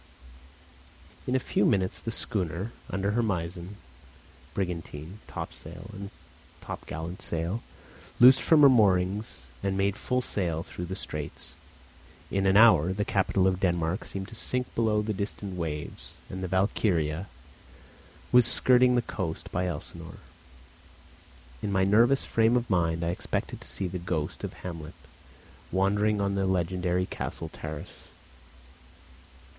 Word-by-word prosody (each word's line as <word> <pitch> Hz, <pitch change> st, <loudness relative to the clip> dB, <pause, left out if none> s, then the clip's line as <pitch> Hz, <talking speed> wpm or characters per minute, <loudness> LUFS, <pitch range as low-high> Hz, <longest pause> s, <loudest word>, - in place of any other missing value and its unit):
In 125 Hz, -, +1 dB
a -, -, +4 dB
few 125 Hz, -, 0 dB
minutes 95 Hz, -3 st, +1 dB
the -, -, -4 dB
schooner, 95 Hz, -2 st, -3 dB, 0.2 s
under 95 Hz, +1 st, -1 dB
her 120 Hz, +3 st, +2 dB
mizen, 90 Hz, -2 st, -3 dB, 0.8 s
brigantine, 90 Hz, -1 st, -4 dB
topsail, 90 Hz, +6 st, -8 dB
and 100 Hz, 0 st, -7 dB, 0.5 s
topgallant 80 Hz, +3 st, -6 dB
sail, 85 Hz, +7 st, -2 dB, 0.6 s
loosed 130 Hz, +2 st, +8 dB
from 155 Hz, -3 st, +5 dB
her -, -, +11 dB
moorings 100 Hz, -, +2 dB, 0.2 s
and 95 Hz, 0 st, -1 dB
made 100 Hz, 0 st, +1 dB
full 125 Hz, +3 st, -1 dB
sail 85 Hz, -8 st, -2 dB
through 90 Hz, -, -6 dB
the 95 Hz, +2 st, -5 dB
straits. 75 Hz, -6 st, -6 dB, 0.8 s
In 95 Hz, 0 st, +1 dB
an 95 Hz, +1 st, +5 dB
hour 95 Hz, -6 st, +6 dB
the 105 Hz, +1 st, -1 dB
capital 95 Hz, -1 st, +1 dB
of 95 Hz, -1 st, +2 dB
Denmark 85 Hz, 0 st, 0 dB
seemed 95 Hz, -1 st, -5 dB
to -, -, -12 dB
sink 125 Hz, +3 st, -2 dB
below 110 Hz, -2 st, +2 dB
the 110 Hz, 0 st, -1 dB
distant 100 Hz, -1 st, -4 dB
waves, 80 Hz, -4 st, -5 dB
and 95 Hz, 0 st, -5 dB
the -, -, -1 dB
Valkyria 95 Hz, -3 st, +1 dB, 1.0 s
was 125 Hz, -1 st, +8 dB
skirting 125 Hz, 0 st, +6 dB
the 120 Hz, -, +2 dB
coast 90 Hz, -8 st, -4 dB
by 90 Hz, +1 st, 0 dB
Elsinore. 90 Hz, -, -7 dB, 1.4 s
In 100 Hz, -, -2 dB
my 95 Hz, -1 st, +3 dB
nervous 115 Hz, +7 st, +4 dB
frame 115 Hz, +2 st, +3 dB
of 120 Hz, -2 st, -3 dB
mind 85 Hz, -2 st, +1 dB
I 85 Hz, -, 0 dB
expected 90 Hz, -, -3 dB
to -, -, -12 dB
see 95 Hz, -, -3 dB
the 90 Hz, +1 st, -4 dB
ghost 85 Hz, -3 st, -3 dB
of -, -, -4 dB
Hamlet 80 Hz, -3 st, -6 dB, 0.8 s
wandering 100 Hz, +3 st, +2 dB
on 100 Hz, 0 st, 0 dB
the 95 Hz, -1 st, 0 dB
legendary 90 Hz, 0 st, 0 dB
castle -, -, -5 dB
terrace. 75 Hz, -1 st, -8 dB
95 Hz, 140 wpm, -28 LUFS, 85-105 Hz, 1.4 s, her